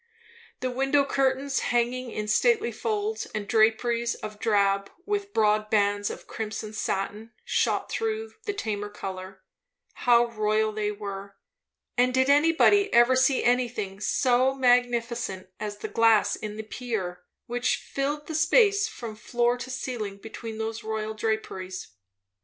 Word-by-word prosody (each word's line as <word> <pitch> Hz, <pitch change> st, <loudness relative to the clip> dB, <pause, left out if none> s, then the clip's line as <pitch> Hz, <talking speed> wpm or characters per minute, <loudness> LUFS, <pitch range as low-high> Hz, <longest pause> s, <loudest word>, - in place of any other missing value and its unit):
The 255 Hz, 0 st, -1 dB
window 270 Hz, +2 st, +2 dB
curtains, 270 Hz, 0 st, +1 dB
hanging 245 Hz, +1 st, 0 dB
in 210 Hz, -2 st, -4 dB
stately 460 Hz, -, +3 dB
folds 430 Hz, 0 st, -2 dB
and 210 Hz, -2 st, -3 dB
draperies 230 Hz, +1 st, +2 dB
of 215 Hz, -1 st, -8 dB
drab, 200 Hz, -2 st, +2 dB, 0.2 s
with 405 Hz, -1 st, -2 dB
broad 215 Hz, -, +2 dB
bands 205 Hz, -1 st, +2 dB
of -, -, -8 dB
crimson 215 Hz, -1 st, -5 dB
satin 215 Hz, +2 st, -3 dB
shot -, -, 0 dB
through 445 Hz, -1 st, -2 dB
the 410 Hz, -, 0 dB
tamer 210 Hz, -, -3 dB
colour, 190 Hz, -2 st, -7 dB, 0.5 s
how 240 Hz, -1 st, +4 dB
royal 215 Hz, -1 st, 0 dB
they 210 Hz, -1 st, -1 dB
were! 200 Hz, -1 st, -7 dB, 0.6 s
And 250 Hz, +1 st, +3 dB
did 260 Hz, +1 st, +4 dB
anybody 330 Hz, +7 st, +4 dB
ever 240 Hz, +2 st, +5 dB
see 260 Hz, +1 st, +3 dB
anything 240 Hz, -6 st, 0 dB
so 255 Hz, +5 st, +2 dB
magnificent 240 Hz, -6 st, +1 dB
as 210 Hz, -1 st, -4 dB
the -, -, -5 dB
glass 225 Hz, -2 st, +3 dB
in 215 Hz, -1 st, -6 dB
the 220 Hz, -, -4 dB
pier, 215 Hz, -6 st, -4 dB, 0.2 s
which 245 Hz, +1 st, 0 dB
filled 290 Hz, +2 st, -3 dB
the 320 Hz, -, -6 dB
space 405 Hz, +7 st, +4 dB
from 230 Hz, -, -7 dB
floor 240 Hz, +2 st, 0 dB
to 255 Hz, -, -6 dB
ceiling 240 Hz, -6 st, -4 dB
between 220 Hz, +1 st, -8 dB
those 225 Hz, 0 st, -4 dB
royal 220 Hz, 0 st, -3 dB
draperies? 210 Hz, -4 st, -3 dB
230 Hz, 140 wpm, -26 LUFS, 210-260 Hz, 0.6 s, ever